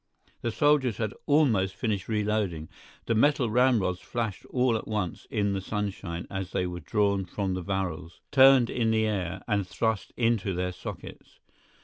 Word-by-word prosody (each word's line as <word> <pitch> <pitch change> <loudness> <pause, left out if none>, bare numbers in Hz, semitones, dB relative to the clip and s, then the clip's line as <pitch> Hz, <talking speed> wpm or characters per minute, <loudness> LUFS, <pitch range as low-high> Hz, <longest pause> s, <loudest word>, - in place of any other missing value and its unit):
The 120 - -1
soldiers 135 -3 +2
had 110 -3 -2
almost 115 -11 +3
finished 105 -6 -2
reloading; 105 -7 -1 0.4
the 115 - +1
metal 125 0 +3
ramrods 110 -7 +2
flashed 115 -3 -4
all 125 -2 +1
at 110 - -4
once 105 -6 -3
in 100 -1 0
the 95 - -2
sunshine 95 -4 -4
as 95 -1 -5
they 90 - 0
were 90 0 -4
drawn 100 -1 +1
from 95 +1 -3
the 90 - -3
barrels, 90 -3 -4
turned 135 -3 +6
in 115 -2 +1
the 110 0 +2
air, 95 -3 -2
and 100 -4 0
thrust 110 +1 -1
into 115 -5 +1
their 90 +1 -1
sockets. 90 - -9
105 Hz, 160 wpm, -27 LUFS, 95-115 Hz, 0.4 s, turned